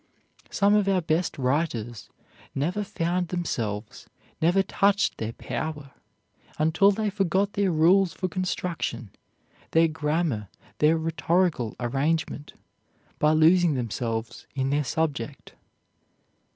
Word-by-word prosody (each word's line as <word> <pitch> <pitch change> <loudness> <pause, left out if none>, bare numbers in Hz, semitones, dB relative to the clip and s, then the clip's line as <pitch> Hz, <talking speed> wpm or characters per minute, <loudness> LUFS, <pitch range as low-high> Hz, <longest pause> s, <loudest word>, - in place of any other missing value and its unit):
Some 200 +1 +3
of 210 -2 +3
our 195 -1 +3
best 160 +2 0
writers 125 - -2 0.5
never 175 +9 -1
found 180 -3 -1
themselves, 115 - -4 0.3
never 175 +4 +3
touched 200 +2 +1
their 110 +1 -3
power, 150 -1 -5 0.7
until 160 +6 +4
they 210 +1 0
forgot 195 0 0
their 200 -1 +1
rules 175 +4 +4
for 185 - -3
construction, 175 - -3 0.6
their 165 0 +5
grammar, 150 - -1 0.3
their 155 +2 +4
rhetorical 165 -5 0
arrangement, 145 +4 -1 0.7
by 150 +1 +4
losing 165 0 +4
themselves 115 -1 -4
in 135 0 0
their 145 +1 +1
subject. 145 -3 -3
160 Hz, 110 wpm, -26 LUFS, 135-185 Hz, 0.7 s, their